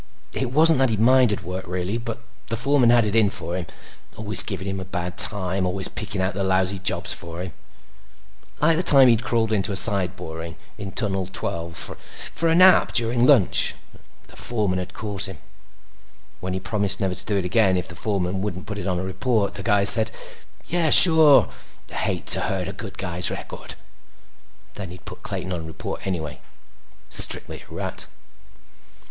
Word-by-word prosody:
It 130 - -3
wasn't 155 +1 +4
that 135 -1 +1
he 110 - -2
minded 120 -3 +2
work 90 +1 -8
really, 90 +5 -4
but 115 -1 -7 0.3
the 115 - -4
foreman 130 0 +2
had 120 -2 +3
it 105 +1 -3
in 110 -3 +2
for 85 -2 -4
him. 90 -3 -6 0.5
Always 105 -1 +6
giving 95 -2 -4
him 95 0 -5
a - - -7
bad 90 -1 -6
time; 95 -2 +1
always 95 +1 -3
picking 105 -3 -7
out 95 +2 -2
the 100 - -4
lousy 95 0 -1
jobs 95 - +1
for 85 0 -7
him. 90 -3 -9 1.1
Like 160 +1 +2
the - - +1
time 135 -7 +6
he'd 115 -1 +1
crawled 115 -3 -2
into 100 -2 -1
a - - -4
side 95 -3 +1
boring 80 -2 -9 0.2
in 100 -2 -9
Tunnel 95 -5 0
12 85 -2 -5
for 165 - -3
a 165 - +1
nap 185 +2 +4
during 120 +1 +3
lunch 125 -11 +2 0.2
and - - -21 0.3
the - - -18
foreman 105 -6 -2
had 90 - -9
caught 100 -2 -3
him. 95 -4 -10 1.0
When 90 +1 -6
he 95 - -4
promised 100 0 -1
never 95 -3 -2
to 90 - -9
do 105 - -1
it 95 - -3
again 95 -1 +1
if 90 - -5
the - - -11
foreman 95 -1 -3
wouldn't 95 -2 -6
put 105 0 -7
it - - -6
on 90 -2 -2
report, 100 +3 -3
the 100 - -9
guy 100 +1 0
said, 110 +2 +7 0.6
"Yeah. 170 -1 -1
Sure. 160 -3 +9 0.4
Hate - - -4
to - - +1
hurt 95 -2 -4
a 95 - -7
guy's 90 -3 -3
record." - - -9 1.0
Then 95 -4 -9
he'd 90 0 -14
put - - -11
Clayton 90 0 -6
on 80 -2 -7
report 80 - -8
anyway. 80 -7 -6 0.7
Strictly - - +3
a - - -12
rat. - - -5
100 Hz, 185 wpm, -21 LUFS, 90-115 Hz, 1.1 s, Sure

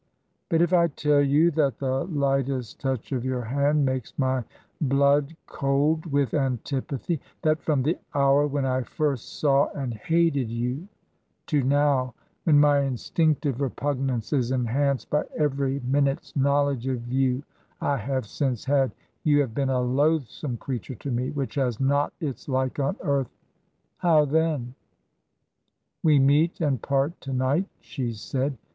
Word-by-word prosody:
'But 165 0 +3
if 175 +1 0
I 170 -1 +5
tell 150 -1 +2
you 145 +5 +4
that 145 -4 +1
the 130 -1 -1
lightest 135 - -1
touch 130 -3 -3
of 125 -3 -1
your 130 -1 -2
hand 140 +4 +1
makes 130 -3 -3
my 130 -2 +1 0.4
blood 140 +2 +2
cold 145 +4 0
with 140 -5 0
antipathy; 135 +3 -2 0.2
that 155 0 +2
from 145 -5 +1
the 160 +6 0 0.2
hour 140 +1 +4
when 140 -1 -1
I 130 0 +1
first 140 0 -3
saw 140 -1 +4
and 135 -4 -3
hated 145 +1 +1
you, 125 - -3 0.6
to 150 -4 +1
now, 135 -2 +2 0.3
when 150 -3 +5
my 145 -1 +5
instinctive 140 +1 0
repugnance 135 -2 -2
is 125 -4 +1
enhanced 130 +2 0
by 150 - +1
every 140 -2 0
minute's 135 +2 0
knowledge 140 -2 +1
of 125 -2 -3
you 130 0 +1 0.4
I 140 - 0
have 130 +1 -2
since 125 +1 -2
had, 135 -1 +2 0.3
you 145 -1 +4
have 130 -6 -3
been 135 +2 0
a 130 -1 +1
loathsome 140 0 0
creature 130 +1 -5
to 135 +5 -6
me 125 +2 -1
which 140 -3 -3
has 125 -5 -1
not 140 +2 +2
its 140 -4 -5
like 130 +1 -1
on 140 +7 0
earth 140 -6 0 0.4
— - - -47
how 160 -4 +4
then?... 150 -4 0 1.3
We 155 -3 +5
meet 145 +5 +3
and 140 -8 0
part 140 +4 0
to 135 - -5
night,' 135 +9 +1
she 125 -5 -4
said. 130 +5 -3
140 Hz, 150 wpm, -25 LUFS, 130-145 Hz, 1.3 s, I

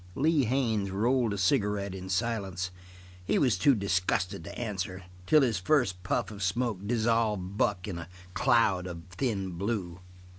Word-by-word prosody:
Lee 150 -1 +3
Haines 110 -5 0
rolled 115 +4 +1
a 100 - -2
cigarette 100 +1 +1
in 95 0 -7
silence. 95 -3 -1 0.5
He - - +1
was 125 -8 +3
too 135 +8 +4
disgusted 90 -3 0
to - - -8
answer, 95 -5 -4 0.2
until 135 +12 +4
his 115 -7 +1
first 95 -5 +1
puff 105 +3 -1
of 100 -1 -9
smoke 110 +2 0
dissolved 110 -4 +1
Buck 100 -3 0
in 90 -4 -4
a 85 0 -8 0.2
cloud 100 -6 +3
of 85 -2 -7
thin 100 -7 -1
blue. 90 -1 -3
100 Hz, 155 wpm, -29 LUFS, 90-115 Hz, 0.5 s, too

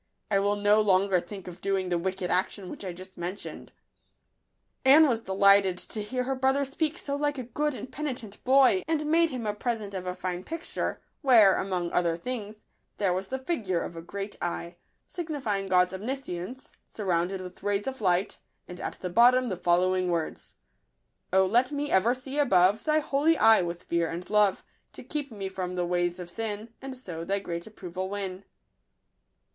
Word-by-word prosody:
I 200 - +4
will 200 +1 +1
no 205 +1 +4
longer 195 -2 +3
think 190 +1 -9
of 180 -1 -9
doing 195 -2 0
the 175 - +1
wicked 185 0 -2
action 185 +1 0
which - - -7
I 185 - -4
just 185 +1 -11
mentioned." 180 +3 -6 1.1
Anne 295 +4 +8
was 235 -4 +1
delighted 195 -2 +4
to 215 +3 -3
hear 250 +5 -2
her 270 +2 -1
brother 265 +2 +2
speak 305 +4 -1
so 280 -4 -2
like 290 0 -1
a 255 - -3
good 295 +4 -2
and 255 - -8
penitent 250 -8 -5
boy, 260 -7 +5
and 310 -2 0
made 330 +2 +3
him 250 -5 -5
a 210 - 0
present 215 -2 -3
of 185 -1 -5
a 180 - -2
fine 180 -1 -4
picture, 330 - -4 0.2
where, 225 - +6
among 180 -3 -2
other 170 -2 +1
things, 215 0 -6 0.3
there 195 -3 +1
was 190 +1 -3
the 265 - -3
figure 235 - -1
of 170 - -7
a 165 - -6
great 200 +4 -6
eye, 170 0 -3 0.3
signifying 275 - -3
God's 180 0 +3
omniscience, 240 0 -5
surrounded 185 -2 -1
with 180 -1 -9
rays 205 0 0
of 265 -3 -5
light, 185 0 +1 0.3
and 180 0 -9
at - - -4
the 180 - -3
bottom 245 +5 +5
the 190 - -2
following 180 +1 +2
words: 165 -2 -3 0.4
— - - -49
O 190 +1 +5
let 240 +8 +2
me 290 0 -2
ever 225 +6 +4
see 265 +3 -5
above 195 -6 +4
Thy 310 0 +3
holy 300 +3 +2
eye 225 -2 +6
with 175 0 -4
fear 170 -1 0
and 175 +2 -6
love, 210 -2 +3 0.3
To - - -9
keep 290 -3 -4
me 200 -3 -5
from 185 -1 -4
the 180 -1 0
ways 175 0 0
of 175 -1 -7
sin, 220 +2 -4
And 270 -1 -6
so 175 -9 -6
Thy 195 +4 0
great 170 -2 -5
approval 185 -3 -6
win. 195 -1 -5
200 Hz, 190 wpm, -28 LUFS, 180-255 Hz, 1.1 s, Anne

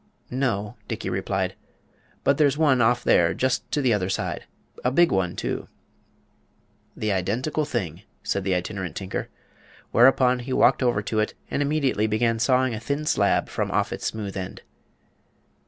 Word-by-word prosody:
"No," 120 -4 -1
Dickey - - -4
replied. - - -1 0.7
"But 140 +1 +2
there's 145 -2 +3
one 145 -6 +4
off 120 +2 +3
there, 85 -1 +4
just 130 0 0
to 145 - 0
the 125 -3 +3
other 95 -3 0
side. - - -3 0.4
A 125 - +3
big 170 +6 +4
one, 95 -2 0
too." - - -3 1.3
"The 110 -1 -1
identical 115 - -1
thing," 95 - -3 0.2
said 100 - -1
the 95 -1 +1
Itinerant 90 -2 -4
Tinker. 95 -1 -4 0.6
Whereupon 125 0 +5
he 125 +2 -4
walked - - +4
over 120 -5 +1
to 110 +1 -1
it 105 - -1 0.2
and - - 0
immediately 140 -7 +1
began 115 +1 +1
sawing 130 +1 +2
a 110 - -4
thin 140 +6 -3
slab - - +2
from - - -2
off - - 0
its - - -3
smooth 105 -3 -4
end. 95 -1 -6
120 Hz, 160 wpm, -24 LUFS, 100-130 Hz, 1.3 s, Whereupon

